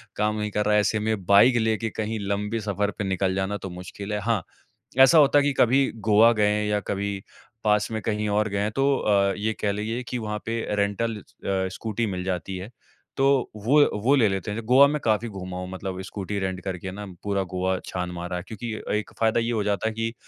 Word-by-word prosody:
काम 105 Hz, 0 st, 0 dB
नहीं 105 Hz, 0 st, -2 dB
कर 105 Hz, +1 st, 0 dB
रहा 105 Hz, -, +2 dB
है, -, -, +5 dB
ऐसे 110 Hz, +1 st, 0 dB
में 105 Hz, -3 st, -2 dB
बाइक 100 Hz, +7 st, +6 dB
लेके 110 Hz, 0 st, 0 dB
कहीं 110 Hz, +1 st, -3 dB
लंबे 105 Hz, +3 st, -1 dB
सफ़र 105 Hz, -1 st, -1 dB
पे -, -, -2 dB
निकल 95 Hz, -1 st, 0 dB
जाना 95 Hz, +2 st, -1 dB
तो 95 Hz, -, -7 dB
मुश्किल 95 Hz, +3 st, -7 dB
है। 105 Hz, -, -1 dB
हाँ, 110 Hz, -3 st, 0 dB, 0.6 s
ऐसा 135 Hz, +5 st, +8 dB
होता 145 Hz, -1 st, +6 dB
है 145 Hz, -, +3 dB
कि 145 Hz, -, +2 dB
कभी 135 Hz, +3 st, +4 dB, 0.2 s
गोवा 110 Hz, +3 st, +7 dB
गए 105 Hz, -2 st, +2 dB
हैं 105 Hz, 0 st, 0 dB
या 105 Hz, 0 st, +1 dB
कभी 100 Hz, 0 st, -3 dB, 0.4 s
पास 105 Hz, 0 st, +2 dB
में 110 Hz, -1 st, -2 dB
कहीं 105 Hz, 0 st, -1 dB
और 105 Hz, +1 st, +1 dB
गए 100 Hz, -1 st, -2 dB
हैं 105 Hz, +1 st, 0 dB
तो 135 Hz, +3 st, +2 dB
अ, 100 Hz, -2 st, +2 dB
ये 110 Hz, +2 st, -1 dB
कह 100 Hz, -, +1 dB
लीजिए 110 Hz, +4 st, -3 dB
कि 125 Hz, -, -3 dB
वहाँ 105 Hz, -2 st, -3 dB
पे 115 Hz, +1 st, -1 dB, 0.2 s
रेन्टल 105 Hz, +3 st, 0 dB
अ, -, -, -12 dB, 0.5 s
स्कूटी 110 Hz, +3 st, -2 dB
मिल 90 Hz, -3 st, -3 dB
जाती 95 Hz, 0 st, -3 dB
है, 95 Hz, +4 st, -7 dB, 0.5 s
तो 135 Hz, -1 st, +2 dB
वो 135 Hz, +8 st, +4 dB, 0.2 s
वो 135 Hz, +5 st, +4 dB
ले 120 Hz, -6 st, +4 dB
लेते 95 Hz, +1 st, -3 dB
हैं, 105 Hz, +2 st, -3 dB
ज -, -, -12 dB
गोवा 130 Hz, +4 st, +7 dB
में 150 Hz, +1 st, -1 dB
काफ़ी 110 Hz, +1 st, +1 dB
घूमा 95 Hz, -3 st, -7 dB
हूँ, 90 Hz, -, -5 dB
मतलब 95 Hz, 0 st, -5 dB
स्कूटी 100 Hz, +1 st, -5 dB
रेंट 95 Hz, -1 st, -2 dB
करके 95 Hz, -1 st, -4 dB
ना 105 Hz, +2 st, -7 dB, 0.2 s
पूरा 100 Hz, -1 st, 0 dB
गोवा 95 Hz, 0 st, 0 dB
छान 90 Hz, -1 st, -4 dB
मारा 90 Hz, +1 st, -4 dB
है 90 Hz, -, -4 dB
क्योंकि 110 Hz, +1 st, -5 dB, 0.3 s
एक 105 Hz, -, -6 dB
फ़ायदा 115 Hz, +1 st, +2 dB
ये 115 Hz, +1 st, -1 dB
हो 110 Hz, -3 st, 0 dB
जाता 105 Hz, +1 st, 0 dB
है -, -, -4 dB
कि 115 Hz, +1 st, -2 dB
105 Hz, 235 wpm, -25 LUFS, 100-115 Hz, 0.6 s, ऐसा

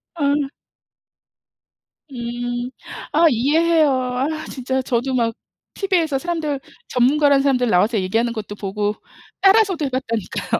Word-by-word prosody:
아. 285 Hz, -3 st, +1 dB, 1.8 s
음. 240 Hz, 0 st, -4 dB, 0.4 s
아 325 Hz, +3 st, +5 dB
이해해요. 310 Hz, +5 st, +3 dB
아 255 Hz, 0 st, -1 dB, 0.2 s
진짜 260 Hz, 0 st, -2 dB
저도 255 Hz, +1 st, -1 dB
막 230 Hz, -2 st, +1 dB, 0.4 s
티비에서 345 Hz, -8 st, 0 dB
사람들 320 Hz, -3 st, -2 dB, 0.3 s
전문가라는 280 Hz, +3 st, +3 dB
사람들 255 Hz, -3 st, +2 dB
나와서 210 Hz, +4 st, +3 dB
얘기하는 225 Hz, +6 st, 0 dB
것도 210 Hz, -2 st, -6 dB
보고 205 Hz, +1 st, -2 dB, 0.5 s
따라서도 390 Hz, -5 st, +4 dB
해 -, -, -1 dB
봤다니까요. 230 Hz, -5 st, -2 dB
260 Hz, 280 characters per minute, -20 LUFS, 235-300 Hz, 1.8 s, 아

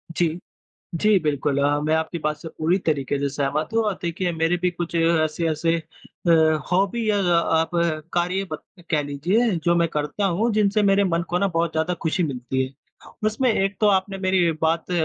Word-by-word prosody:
जी। 170 Hz, 0 st, 0 dB, 0.6 s
जी, 210 Hz, -2 st, +4 dB
बिल्कुल, 145 Hz, -3 st, -1 dB
अ, 145 Hz, +1 st, +2 dB
मैं 155 Hz, +1 st, +1 dB
आपकी 160 Hz, +1 st, -2 dB
बात 150 Hz, 0 st, -2 dB
से 160 Hz, -, -9 dB
पूरी 165 Hz, +4 st, 0 dB
तरीके 140 Hz, -2 st, 0 dB
से 140 Hz, 0 st, 0 dB
सहमत 145 Hz, +2 st, -1 dB
हूँ 225 Hz, -, +3 dB
और 210 Hz, -2 st, 0 dB
देखिए 175 Hz, +1 st, -2 dB
मेरे 165 Hz, +2 st, +1 dB
भी 180 Hz, -, +2 dB
कुछ 175 Hz, -1 st, -5 dB
ऐसे-ऐसे 165 Hz, 0 st, +1 dB
अ, 170 Hz, +1 st, -6 dB, 0.4 s
हॉबी 200 Hz, +5 st, +1 dB
या 205 Hz, -, +2 dB
अ, -, -, +1 dB, 0.4 s
आप 165 Hz, +1 st, 0 dB, 0.4 s
कार्य 180 Hz, +3 st, 0 dB
बक 155 Hz, -, -6 dB, 0.3 s
कह 150 Hz, -3 st, +2 dB
लीजिए 175 Hz, +12 st, +1 dB
जो 170 Hz, 0 st, +3 dB
मैं 170 Hz, -1 st, +2 dB
करता 150 Hz, +7 st, -2 dB
हूँ, 200 Hz, +6 st, +1 dB
जिनसे 210 Hz, 0 st, +2 dB
मेरे 200 Hz, 0 st, +3 dB
मन 170 Hz, -2 st, 0 dB
को 180 Hz, -, +1 dB
ना 200 Hz, +1 st, +1 dB
बहुत 165 Hz, -1 st, -1 dB
ज़्यादा 160 Hz, +3 st, 0 dB
खुशी 170 Hz, +3 st, 0 dB
मिलती 130 Hz, -2 st, -2 dB
है। 130 Hz, -, -13 dB, 0.5 s
उसमें 225 Hz, +3 st, +1 dB
एक 195 Hz, -1 st, 0 dB
तो 210 Hz, -, +4 dB
आपने 195 Hz, 0 st, +1 dB
मेरी 185 Hz, -2 st, +2 dB
बात 165 Hz, +2 st, 0 dB
170 Hz, 190 wpm, -23 LUFS, 155-195 Hz, 0.6 s, जी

